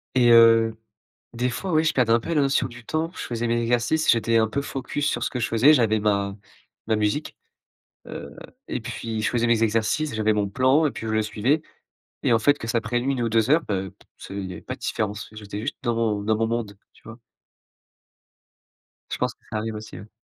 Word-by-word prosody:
Et 120 -2 +5
heu, 115 -1 +6 0.6
des 125 +2 0
fois, 185 +8 -4
ouais, 155 +1 +3
je - - +2
perdais 120 -3 +2
un 115 - +4
peu 165 - -7
la 150 - +3
notion 140 0 +2
du 120 0 -12
temps, 160 +1 -1
je - - -11
faisais 120 0 -3
mes 120 0 +1
exercices, 120 +7 +2
j'étais 115 -1 +3
un 110 -1 +2
peu 140 +5 -2
focus 140 +2 -3
sur - - -1
ce - - +1
que 125 - -5
je 110 - 0
faisais, 130 +7 +5
j'avais 110 -4 +2
ma 100 -1 0 0.5
ma 110 -1 +1
musique, 105 +8 -1 0.7
heu, - - -8 0.3
et 125 - -3
puis 110 0 -5
je - - +1
faisais 120 -1 +1
mes 115 -1 +2
exercices, 115 +6 0
j'avais 110 0 +2
mon 105 -1 0
plan 130 +8 +3
et - - 0
puis 115 - -7
je 110 - -2
le 110 0 +2
suivais 125 +9 0 0.6
et - - +3
en 115 - +5
fait, 145 +6 +3
que - - -6
ça 115 +1 0
prenne 120 +3 -2
1 130 -3 0
ou 115 - +1
2 115 +2 +2
heures, 160 +2 +5
heu, 95 -1 -2
p - - -25
ce - - -11
il 100 -1 -4
y 90 - -7
avait 85 - -9
pas - - -5
de - - -18
différences, 105 -2 -3
j'étais 105 -1 -7
juste - - -4
dans 120 -2 0
mon 110 -3 0
dans 110 +1 +1
mon 115 +1 0
monde, 115 -4 -3 0.2
tu - - -24
vois? 115 +2 -11 1.9
Je - - -2
pense - - -1
que - - -49
ça 110 - -2
arrive 110 0 -3
aussi, 105 +1 -8
oui. 105 - -12
115 Hz, 235 wpm, -24 LUFS, 110-125 Hz, 1.9 s, heu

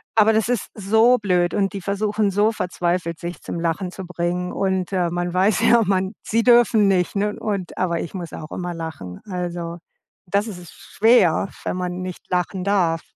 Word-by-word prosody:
Aber 220 0 +6
das 220 +1 +2
ist 245 -5 0
so 220 +4 +4
blöd 180 -5 +1
und 200 0 0
die 195 - -5
versuchen 205 +2 0
so 205 +3 +3
verzweifelt, 175 -4 -2
sich 175 0 -6
zum 170 - -5
Lachen 170 +3 -1
zu 190 0 -8
bringen 180 0 -2
und, 190 -1 -1
äh, 180 -2 +1
man 175 0 -2
weiß 195 +3 +2
ja, 235 0 +5
man 190 +1 0
sie 230 +1 +1
dürfen 235 -4 +5
nicht, 185 -1 +1
ne? 210 +1 -1
Und 200 -4 -3
aber 170 -2 0
ich - - -7
muss 175 -4 -6
auch 155 - -8
immer 175 -1 -4
lachen. 145 - -7
Also, 175 -3 -4 0.5
das 200 +3 +1
is 185 -4 -7
ist 175 - -12
schwer, 200 -6 +3 0.2
wenn - - -2
man 180 0 -3
nicht 185 -1 -8
lachen 180 +1 -1
darf. 180 -4 +1
185 Hz, 190 wpm, -22 LUFS, 175-205 Hz, 0.5 s, Aber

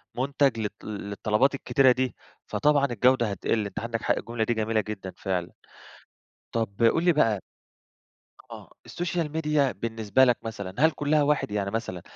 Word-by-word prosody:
منتج 135 -1 +1
للط 105 -2 -5
للطلبات 105 +5 0
الكتيرة 135 -1 +3
دي، 130 0 -1 0.3
فطبعًا 145 -1 +2
الجودة 125 -3 +2
هتقل، 105 +2 -1
أنت 100 - -5
عندك 115 0 -3
حق، - - +1
الجملة 115 -1 -3
دي 120 - 0
جميلة 110 0 0
جدًا 100 -3 -7
فعلًا، 90 -3 -2 1.0
طب 115 -1 -2
قُل 140 +8 +4
لي 175 -1 +4
بقى 115 -10 +2 1.1
آه، - - -10 0.2
السوشيال 175 -3 -3
ميديا 150 -3 +1
بالنسبة 115 +1 +1
لك 120 -2 +3
مثلًا 100 -4 -6
هل 160 +2 +5
كلّها 150 0 +1
واحد؟ 145 -6 +1
يعني 100 -1 -2
مثلًا 110 -5 -4
115 Hz, 155 wpm, -26 LUFS, 105-140 Hz, 1.1 s, هل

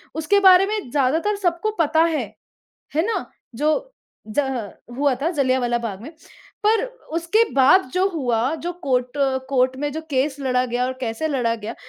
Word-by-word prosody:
उसके 320 +6 +2
बारे 380 0 +7
में 420 - -3
ज़्यादातर 300 +9 +1
सबको 360 +2 0
पता 320 +1 +3
है। 310 -6 0 0.7
है 315 - +2
ना? 455 - -2 0.3
जो 305 - 0 0.4
ज़ह 245 -4 -2 0.3
हुआ 280 -2 +2
था 330 - +1
जलियाँवाला 255 -5 +1
बाग़ 210 -5 -5
में। 290 - -8 0.6
पर 445 +3 +3 0.3
उसके 340 +7 +2
बाद 280 +8 +5
जो 375 +2 +2
हुआ 255 -4 0
जो 350 - -2
कोर्ट 250 0 0
अ, 270 -1 +1
कोर्ट 260 -1 +1
में 290 0 -2
जो 315 - -4
केस 270 +1 0
लड़ा 255 -1 +1
गया 245 +1 -1
और 260 - -2
कैसे 245 +6 -2
लड़ा 245 -5 0
गया 220 +1 -7
280 Hz, 170 wpm, -22 LUFS, 250-335 Hz, 0.7 s, बारे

